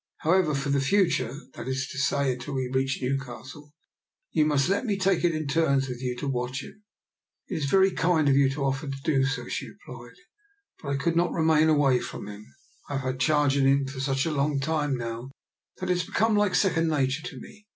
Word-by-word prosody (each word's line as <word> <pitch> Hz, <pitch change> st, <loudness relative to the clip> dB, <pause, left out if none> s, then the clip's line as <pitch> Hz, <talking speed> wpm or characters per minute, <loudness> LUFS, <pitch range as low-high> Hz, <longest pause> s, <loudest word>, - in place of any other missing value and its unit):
However, 165 Hz, -2 st, +2 dB
for 140 Hz, +1 st, -2 dB
the 140 Hz, -1 st, +2 dB
future 175 Hz, -, +2 dB, 0.2 s
— -, -, -31 dB
that -, -, -8 dB
is 130 Hz, 0 st, -2 dB
to 140 Hz, -, -5 dB
say, 140 Hz, 0 st, +1 dB
until 130 Hz, +3 st, -6 dB
we 130 Hz, -1 st, -1 dB
reach 135 Hz, +1 st, 0 dB
Newcastle 135 Hz, +3 st, -5 dB, 0.3 s
— -, -, -45 dB
^you 150 Hz, -, +4 dB
must 145 Hz, -3 st, +2 dB
let 200 Hz, +5 st, +1 dB
me 210 Hz, -5 st, -1 dB
take 190 Hz, -2 st, +1 dB
it 170 Hz, -2 st, +2 dB
in 155 Hz, 0 st, -3 dB
turns 140 Hz, -2 st, +1 dB
with 125 Hz, -1 st, -6 dB
you 125 Hz, -1 st, -2 dB
to 140 Hz, -, -4 dB
watch 130 Hz, +1 st, -2 dB
him." 210 Hz, -, -13 dB, 0.3 s
" -, -, -63 dB
It 175 Hz, -, -2 dB
is 150 Hz, -, -2 dB
very 190 Hz, +6 st, +4 dB
kind 165 Hz, -3 st, +2 dB
of 140 Hz, -, +4 dB
you 140 Hz, -1 st, +4 dB
to 140 Hz, +1 st, -3 dB
offer 135 Hz, +2 st, -1 dB
to 135 Hz, 0 st, -4 dB
do 140 Hz, -5 st, +2 dB
so," 135 Hz, +2 st, -3 dB
she -, -, -4 dB
replied, -, -, -12 dB, 0.7 s
but 140 Hz, -, -6 dB
I 140 Hz, -, 0 dB
could 165 Hz, +4 st, 0 dB
not 175 Hz, +1 st, +2 dB
remain 160 Hz, -1 st, +3 dB
away 140 Hz, -5 st, +4 dB
from -, -, -7 dB
him. 105 Hz, +1 st, -10 dB, 0.4 s
I -, -, -4 dB
have 135 Hz, -, -1 dB
had 130 Hz, 0 st, -3 dB
charge 145 Hz, 0 st, +2 dB
of 135 Hz, -, +3 dB
him 140 Hz, 0 st, +3 dB
for 135 Hz, 0 st, -7 dB
such 135 Hz, 0 st, 0 dB
a 165 Hz, -, -1 dB
long 140 Hz, 0 st, 0 dB
time 145 Hz, -2 st, -1 dB
now 120 Hz, +1 st, -5 dB, 0.5 s
that 185 Hz, 0 st, -2 dB
it 180 Hz, -, +2 dB
has -, -, 0 dB
become 220 Hz, +1 st, +2 dB
like 205 Hz, -3 st, +2 dB
second 170 Hz, -4 st, +2 dB
nature 140 Hz, -1 st, 0 dB
to 140 Hz, -8 st, -9 dB
me. 210 Hz, +8 st, -14 dB
140 Hz, 235 wpm, -26 LUFS, 135-160 Hz, 0.7 s, ^you